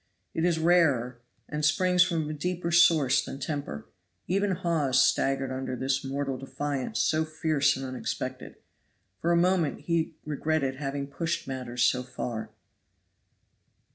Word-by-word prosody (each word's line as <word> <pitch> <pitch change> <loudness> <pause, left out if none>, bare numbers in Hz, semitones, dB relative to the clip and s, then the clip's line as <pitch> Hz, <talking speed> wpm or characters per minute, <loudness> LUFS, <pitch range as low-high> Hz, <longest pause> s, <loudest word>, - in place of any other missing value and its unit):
It 165 - 0
is 175 -2 +2
rarer, 150 -8 +3 0.3
and 150 0 -4
springs 180 +4 +3
from 170 -4 +2
a 155 - -3
deeper 170 +2 -2
source 155 -5 +5
than - - -7
temper. 140 - -4 0.4
Even 200 +3 +1
Hawes 165 -8 +1
staggered 135 -1 +1
under 130 0 -3
this 135 +2 -1
mortal 135 -1 -3
defiance 140 0 -3
so 155 0 +2
fierce 155 -3 +1
and 135 - -5
unexpected. 130 -1 -5 0.7
For 170 - +1
a - - +4
moment 175 -4 +2
he 165 -1 -1
regretted 150 -2 -1
having 140 0 -3
pushed 165 +3 -3
matters 125 -2 -2
so 125 - +3
far. 125 -3 -5
145 Hz, 140 wpm, -28 LUFS, 135-165 Hz, 0.7 s, source